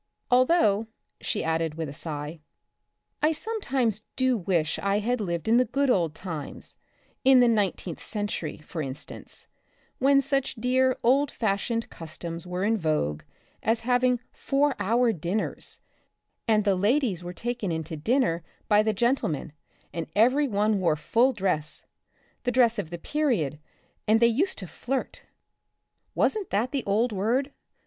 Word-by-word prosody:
Although," 245 - +4 0.3
she 215 - -2
added 160 -1 0
with 160 -1 -3
a 140 - -7
sigh, 150 0 -5 0.4
" - - -53
I 305 - +4
sometimes 275 - -1
do 260 -1 +2
wish 170 -6 0
I 200 0 +1
had 230 +3 0
lived 170 -1 -3
in 230 +2 +5
the 250 - +4
good 275 +3 +1
old 165 -8 +1
times, 165 -6 -7 0.5
in 265 -1 +7
the 245 - +6
nineteenth 200 -6 0
century, 205 -7 -3
for 155 +2 -6
instance, 135 +1 -8 0.5
when 275 +1 +5
such 275 0 0
dear 255 +2 +2
old 275 +4 +4
fashioned 230 +2 -1
customs 165 +1 -7
were 180 +1 -2
in 220 +2 +2
vogue 115 - 0 0.4
as 225 +1 +1
having 250 +1 +2
four 285 +1 +1
hour 230 +3 +2
dinners, 180 +4 -3 0.7
and 215 -2 +3
the 200 -1 +3
ladies 205 - +1
were 175 - -5
taken 235 0 -3
into 160 0 -3
dinner 170 - +1 0.2
by 210 -1 +5
the 215 0 +1
gen 240 +6 +2
tlemen 155 - -3 0.4
and 165 -1 -3
every 255 +7 +4
one 210 -2 +1
wore 170 -4 +2
full 230 - +2
dress 180 - -2 0.3
— - - -39
the 245 - +1
dress 235 -3 +3
of 165 - -4
the 175 - -5
period, 175 - 0 0.5
and 220 +1 +5
they 235 - +5
used 280 - +1
to 190 - -5
flirt 245 - -4 0.4
— - - -52
wasn't 420 -4 +1
that 225 +6 0
the 275 -4 -1
old 220 +5 +2
word? 235 +8 0
215 Hz, 155 wpm, -27 LUFS, 170-250 Hz, 0.7 s, in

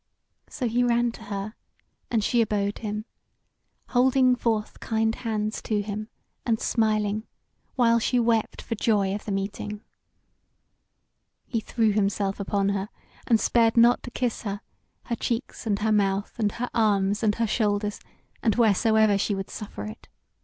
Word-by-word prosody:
So 255 -4 -2
he 240 +2 +2
ran 240 0 +2
to 225 - -12
her, 200 +1 -4 0.6
and 225 -3 +1
she 235 +2 +3
abode 205 -2 0
him, 210 0 -4 0.8
holding 255 0 +4
forth 225 -3 -1
kind 225 0 0
hands 215 -2 -2
to 210 -2 -1
him, 210 +1 -5 0.4
and 225 -2 +1
smiling, 215 -1 0 0.5
while 235 -2 +4
she 245 +2 +1
wept 230 -2 +1
for - - -3
joy 205 -3 +1
of 205 - -5
the 210 - -3
meeting. 205 +1 -3 1.6
He 230 - -1
threw 220 0 +1
himself 200 -1 0
upon 200 0 0
her, 200 0 -2 0.4
and 230 -3 +4
spared 230 0 +3
not 240 +1 +6
to - - -7
kiss 245 -1 -2
her, 200 -1 -4 0.4
her 235 - -2
cheeks 235 +1 -3
and 205 -2 +2
her 220 +2 0
mouth, 200 -1 +1
and 210 -2 +1
her 245 +1 -4
arms 205 -2 +2
and 210 -2 +2
her 230 - +1
shoulders, 210 -2 0 0.4
and 220 -5 +2
wheresoever 220 -2 +4
she 205 +1 0
would 195 0 -5
suffer 200 - -7
it. 105 - -9
215 Hz, 155 wpm, -26 LUFS, 205-230 Hz, 1.6 s, not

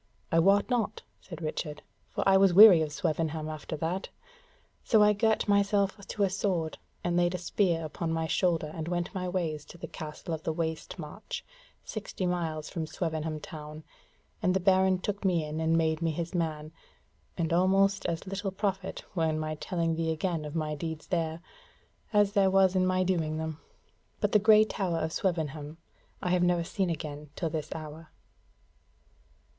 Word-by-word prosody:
"I 165 - +4
wot 200 +4 +4
not," 230 -4 -1 0.2
said 170 -3 -9
Richard, 150 -1 -4 0.3
"for - - -2
I 195 - +6
was 190 -2 +5
weary 200 -5 +10
of 155 -1 -1
Swevenham 155 +1 -1
after 155 0 -5
that, 170 +5 -2 0.7
so 220 -2 +5
I 210 0 +5
girt 220 +1 +1
myself 200 -1 +2
to 205 - -1
a - - +4
sword 180 -5 -1 0.2
and 175 0 0
laid 175 +1 +2
a - - -1
spear 175 -2 0
upon 160 +2 -3
my 165 0 0
shoulder 165 -2 +1
and 160 -1 -5
went 175 0 -2
my 185 -1 -3
ways 165 -5 -2
to - - -12
the - - -6
Castle 155 +2 -7
of 160 - -3
the 160 - -1
Waste 160 +1 -3
March, 165 +5 -7 0.4
sixty 200 -3 -5
miles 165 -4 -2
from 165 -4 -4
Swevenham 160 -2 -3
town, 155 0 -9 0.6
and 185 +1 +2
the - - +3
Baron 190 0 +4
took 200 +2 -4
me 175 -5 +2
in 150 +1 -4
and 160 +1 +2
made 160 0 +1
me 165 - +1
his 165 +3 -3
man: 155 -3 -2 0.7
and 170 -2 0
almost 195 +2 +3
as 165 -1 -3
little 195 +1 -3
profit 195 0 -3
were 165 -4 +1
in 155 - -1
my 155 0 -2
telling 165 +1 -1
thee 165 0 -1
again 160 -1 -2
of 150 +1 -7
my 155 -2 -1
deeds 160 +1 -5
there, 165 -2 -1 0.7
as 205 -2 +4
there 200 -2 +4
was 190 -1 +4
in 185 0 +3
my 185 0 +2
doing 165 -4 0
them: 160 -1 -4 0.6
but - - +1
the 210 - +5
grey 215 +1 +7
tower 190 -5 -2
of 160 0 -2
Swevenham 155 -4 -2 0.5
I 180 - 0
have 180 -1 +3
never 175 -1 +2
seen 185 +2 -1
again 150 -2 -5
till 165 -3 -2
this 155 -1 -3
hour." 155 0 -8
170 Hz, 185 wpm, -29 LUFS, 160-190 Hz, 0.7 s, weary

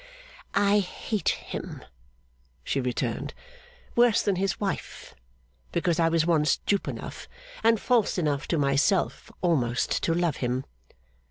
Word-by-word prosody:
'I 205 +1 +4
hate 205 +2 -2
him,' - - -5 0.8
she 135 - -1
returned. 125 -1 -2 0.6
'Worse 240 -2 +4
than 195 -3 +1
his 190 -3 0
wife, 200 -2 -4 0.6
because 170 -1 +1
I 165 -1 +4
was 165 -1 +2
once 155 -4 +3
dupe 200 -1 0
enough, - - -6 0.4
and 225 -1 +4
false 235 -5 +2
enough 150 -4 0
to 170 - +1
myself, 145 +7 +1
almost 125 -9 +1
to 165 - +1
love 170 -4 +1
him. 125 +1 -1
170 Hz, 125 wpm, -27 LUFS, 145-200 Hz, 0.8 s, I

